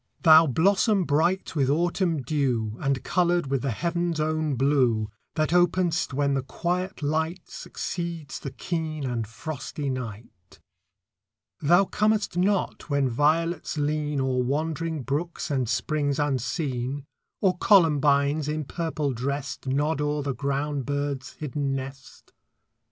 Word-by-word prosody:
Thou 160 Hz, -1 st, +8 dB
blossom 195 Hz, -, +3 dB
bright 170 Hz, +5 st, +1 dB
with 135 Hz, -3 st, +2 dB
autumn 170 Hz, 0 st, +1 dB
dew, 125 Hz, -6 st, 0 dB
And 135 Hz, -2 st, -1 dB
coloured 175 Hz, -5 st, +1 dB
with 135 Hz, -2 st, +1 dB
the 135 Hz, -, -1 dB
heaven's 170 Hz, +5 st, -1 dB
own 155 Hz, -1 st, 0 dB
blue, 125 Hz, -5 st, +2 dB, 0.2 s
That 155 Hz, +1 st, +1 dB
openest 175 Hz, -1 st, +2 dB
when 140 Hz, +1 st, +1 dB
the 135 Hz, -, +1 dB
quiet 180 Hz, +6 st, -3 dB
light 160 Hz, +4 st, -1 dB
Succeeds 170 Hz, -5 st, -5 dB
the -, -, -5 dB
keen 155 Hz, 0 st, -3 dB
and 120 Hz, -4 st, -2 dB
frosty 140 Hz, +3 st, -5 dB
night. 110 Hz, -7 st, -8 dB, 1.0 s
Thou 175 Hz, +7 st, +4 dB
comest 210 Hz, -1 st, +1 dB
not 190 Hz, -1 st, 0 dB
when 140 Hz, -2 st, +2 dB
violets 160 Hz, +6 st, +1 dB
lean 150 Hz, 0 st, 0 dB
O'er 130 Hz, -1 st, +1 dB
wandering 155 Hz, +3 st, -2 dB
brooks 155 Hz, +5 st, -3 dB
and 130 Hz, -5 st, 0 dB
springs 140 Hz, +4 st, 0 dB
unseen, 135 Hz, 0 st, -2 dB, 0.3 s
Or 185 Hz, -3 st, +2 dB
columbines, 150 Hz, -5 st, +4 dB
in 155 Hz, 0 st, -1 dB
purple 155 Hz, -2 st, -2 dB
dressed, 140 Hz, +3 st, -4 dB
Nod 145 Hz, +3 st, 0 dB
o'er 150 Hz, 0 st, 0 dB
the 140 Hz, -1 st, -1 dB
ground 140 Hz, 0 st, -2 dB
bird's 145 Hz, -2 st, -2 dB
hidden 145 Hz, -2 st, -2 dB
nest. 135 Hz, 0 st, -9 dB
145 Hz, 130 wpm, -26 LUFS, 135-165 Hz, 1.0 s, Thou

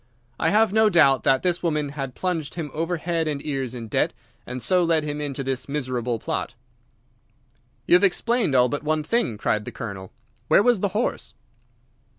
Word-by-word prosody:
I -, -, +2 dB
have 215 Hz, -1 st, +3 dB
no 220 Hz, 0 st, +5 dB
doubt 145 Hz, -8 st, +5 dB
that 135 Hz, -1 st, +3 dB
this 175 Hz, -1 st, 0 dB
woman 150 Hz, -4 st, -1 dB
had 135 Hz, -3 st, -6 dB
plunged 165 Hz, -5 st, -2 dB
him 160 Hz, -5 st, -5 dB
over 165 Hz, +3 st, -1 dB
head 165 Hz, 0 st, -1 dB
and 145 Hz, -2 st, -2 dB
ears 135 Hz, -4 st, -3 dB
in 115 Hz, -2 st, -6 dB
debt, -, -, 0 dB, 0.3 s
and 125 Hz, -, -5 dB
so 180 Hz, +7 st, +2 dB
led 165 Hz, -2 st, +2 dB
him 150 Hz, 0 st, -4 dB
into 140 Hz, -2 st, -4 dB
this 135 Hz, +1 st, -3 dB
miserable 125 Hz, -4 st, -2 dB
plot." 110 Hz, -, -4 dB, 1.3 s
"You -, -, +2 dB
have 180 Hz, +3 st, +6 dB
explained 205 Hz, -, +2 dB
all 125 Hz, -1 st, +5 dB
but 145 Hz, +3 st, -3 dB
one 155 Hz, 0 st, 0 dB
thing," 155 Hz, -, 0 dB
cried 105 Hz, 0 st, 0 dB
the -, -, -7 dB
Colonel. 95 Hz, -5 st, -7 dB, 0.4 s
"Where -, -, +5 dB
was 240 Hz, -3 st, +3 dB
the 200 Hz, -, +1 dB
horse?" 240 Hz, -, -2 dB
150 Hz, 185 wpm, -24 LUFS, 130-175 Hz, 1.3 s, have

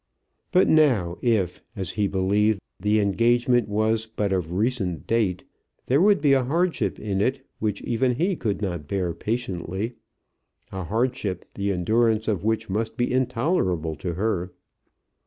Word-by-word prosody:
But 185 Hz, -1 st, +4 dB
now 120 Hz, -, +3 dB
if, 105 Hz, -8 st, +1 dB
as 95 Hz, -5 st, -3 dB
he 105 Hz, -2 st, 0 dB
believed, 100 Hz, +2 st, +2 dB, 0.2 s
the 105 Hz, +3 st, +2 dB
engagement 120 Hz, +3 st, +2 dB
was 110 Hz, +1 st, +1 dB
but 105 Hz, -3 st, -1 dB
of 90 Hz, -3 st, -1 dB
recent 100 Hz, -3 st, -1 dB
date, 105 Hz, -6 st, 0 dB, 0.4 s
there 135 Hz, +5 st, +3 dB
would 200 Hz, -3 st, +4 dB
be 145 Hz, -2 st, +4 dB
a 135 Hz, -1 st, +3 dB
hardship 170 Hz, +7 st, 0 dB
in 100 Hz, -2 st, -1 dB
it, 130 Hz, +4 st, 0 dB
which 105 Hz, -2 st, -2 dB
even 125 Hz, +1 st, +1 dB
he 180 Hz, +8 st, +1 dB
could 105 Hz, -7 st, -2 dB
not 85 Hz, -7 st, -3 dB
bear 90 Hz, -2 st, -1 dB
patiently, 105 Hz, -1 st, -3 dB, 0.8 s
a 95 Hz, -2 st, -5 dB
hardship, 110 Hz, -3 st, -1 dB
the 100 Hz, 0 st, -1 dB
endurance 110 Hz, +4 st, +1 dB
of 100 Hz, -5 st, 0 dB
which 110 Hz, 0 st, 0 dB
must 110 Hz, +5 st, -2 dB
be 120 Hz, 0 st, 0 dB
intolerable 115 Hz, -, 0 dB
to 85 Hz, +1 st, -4 dB
her. 95 Hz, -2 st, -1 dB
110 Hz, 150 wpm, -24 LUFS, 95-120 Hz, 0.8 s, But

